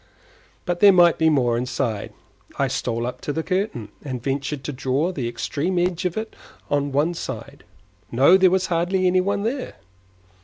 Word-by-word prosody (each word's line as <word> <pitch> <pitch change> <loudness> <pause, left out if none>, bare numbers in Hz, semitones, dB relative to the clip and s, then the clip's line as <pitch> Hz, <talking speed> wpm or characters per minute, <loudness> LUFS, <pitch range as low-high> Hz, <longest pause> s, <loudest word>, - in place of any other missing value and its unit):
But 175 -1 -2
there 205 +1 +8
might 175 -3 +5
be 160 0 +4
more 125 -6 +2
inside. 120 -4 -3 0.5
I - - +1
stole 115 +1 -2
up 125 - -5
to - - -3
the 160 +2 -2
curtain, 185 - -2
and 130 -4 -5
ventured 140 +1 -2
to 150 - -4
draw 135 +6 0
the 135 -9 -3
extreme 140 +9 -2
edge 180 +1 0
of 180 +1 -1
it 220 0 -5 0.4
on 145 0 +1
one 150 +5 +1
side. - - -7 0.5
No, 135 +9 +6
there 190 -1 +5
was 190 +1 +1
hardly 180 +2 0
any 185 0 +3
one 200 +2 -1
there. 250 +4 -3
160 Hz, 180 wpm, -22 LUFS, 130-185 Hz, 0.5 s, there